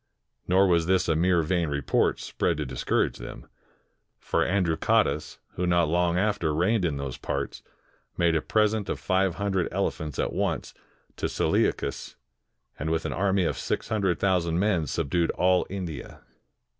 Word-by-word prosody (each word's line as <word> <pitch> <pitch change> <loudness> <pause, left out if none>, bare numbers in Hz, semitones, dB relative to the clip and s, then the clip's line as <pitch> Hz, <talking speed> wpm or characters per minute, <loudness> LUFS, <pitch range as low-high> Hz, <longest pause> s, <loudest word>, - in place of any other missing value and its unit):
Nor 95 +2 +5
was 85 -3 +2
this 95 0 +2
a 80 - +2
mere 85 +1 +3
vain 85 0 0
report, 70 -1 +1
spread - - -1
to 75 - -2
discourage 65 -1 -1
them. - - -9 0.7
For - - 0
Androcottus, 90 -3 +1 0.2
who 90 - -2
not 85 -2 +3
long 85 +1 +2
after 95 -6 0
reigned 95 +4 +2
in 75 -4 -1
those 70 -2 -5
parts, 70 0 -4 0.6
made 85 -1 +3
a 80 - +2
present 105 0 +1
of - - -2
five 95 -1 +1
hundred 95 -1 0
elephants 80 -7 -2
at - - -1
once - - -2 0.4
to - - -1
Seleucus, - - 0 0.6
and 80 - -2
with 80 0 -1
an - - -2
army 95 0 +1
of - - -1
six - - -3
himdred 95 -6 +1
thousand 90 -4 +1
men 90 -5 +1
subdued 85 +6 0
all 90 0 +3
India. 90 -8 -6
90 Hz, 155 wpm, -26 LUFS, 80-95 Hz, 0.7 s, Nor